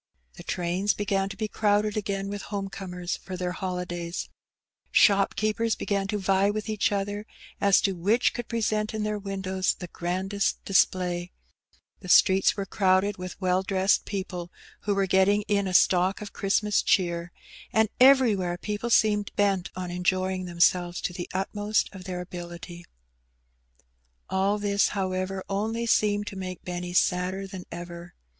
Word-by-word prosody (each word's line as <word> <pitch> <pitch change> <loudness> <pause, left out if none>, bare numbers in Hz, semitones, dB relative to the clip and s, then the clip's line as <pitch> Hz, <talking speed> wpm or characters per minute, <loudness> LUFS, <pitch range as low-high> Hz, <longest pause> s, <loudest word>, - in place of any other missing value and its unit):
The - - -11
trains 180 +3 0
began 195 -1 0
to - - -8
be 215 - -2
crowded 210 0 +1
again 195 -2 -2
with 205 0 -4
home 200 -1 -3
comers 180 -2 -5
for 185 0 -7
their 180 0 -2
holidays; 180 -2 -4 0.6
shopkeepers 215 +2 +3
began 200 -1 -1
to 210 +1 -1
vie 195 0 +2
with 215 +1 -3
each 215 0 +1
other 205 +1 -2 0.3
as 200 -1 +5
to 195 - +1
which 200 +7 +2
could 240 -1 -5
present 215 -2 -1
in 215 - -2
their 210 0 -2
windows 190 -2 -1
the 180 - -7
grandest 185 +4 -2
display; 180 -2 +1 0.7
the 180 - -10
streets 190 +3 +5
were 200 - -2
crowded 190 +1 +2
with 180 +1 -7
well 185 -1 +2
dressed 190 0 +2
people 180 -3 -5 0.4
who 205 - +2
were 195 0 +2
getting 190 +2 +3
in 200 -1 0
a - - -2
stock 185 +1 +4
of 210 -1 -8
Christmas 205 +1 +1
cheer; 170 -2 +1 0.4
and 220 0 +3
everywhere 230 -10 +5
people 210 +5 -4
seemed 210 -2 +3
bent 195 -3 +1
on 180 -1 -4
enjoying 185 +1 0
themselves 175 0 +2
to - - -3
the 175 0 -6
utmost 205 +3 0
of 185 -2 -10
their 180 -2 -4
ability. 175 -1 -8 1.5
All 195 +2 +1
this^ 200 -1 +2
however^ 185 0 -2
only 220 +4 -1
seemed 205 -2 +2
to 200 - -7
make 185 -2 -6
Benny 175 0 -4
sadder 180 +2 +1
than 190 -2 -8
ever. 175 0 -8
195 Hz, 155 wpm, -26 LUFS, 180-205 Hz, 1.5 s, as